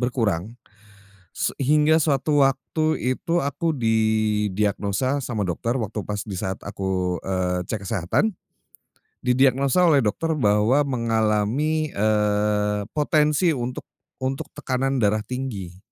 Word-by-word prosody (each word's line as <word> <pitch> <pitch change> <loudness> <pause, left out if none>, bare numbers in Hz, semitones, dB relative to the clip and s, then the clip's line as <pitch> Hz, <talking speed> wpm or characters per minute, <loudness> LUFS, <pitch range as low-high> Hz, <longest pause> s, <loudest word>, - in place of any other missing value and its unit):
berkurang, 115 -4 -1 0.8
se - - 0
hingga 150 +3 +4
suatu 145 -1 +1
waktu 155 +4 -1 0.2
itu 170 -2 -1
aku 145 +3 -1
didiagnosa 110 +1 0
sama 120 -6 -3
dokter 95 +7 -2
waktu 110 -4 -3
pas 105 -1 -3
di 105 - -9
saat 95 -2 -4
aku, 95 -3 -2
eee, 90 -1 -1
cek 105 -3 -4
kesehatan. 100 - 0 0.9
Didiagnosa 135 +6 +3
oleh 145 -5 +4
dokter 160 +9 -1
bahwa 115 +2 +3
mengalami, 115 +5 0
eee, 105 0 +1
potensi 150 +2 +2
untuk 125 0 -5 0.3
untuk 130 +1 -3
tekanan 135 +1 -1
darah 105 -1 +2
tinggi. 105 -8 -6
115 Hz, 115 wpm, -23 LUFS, 105-140 Hz, 0.9 s, hingga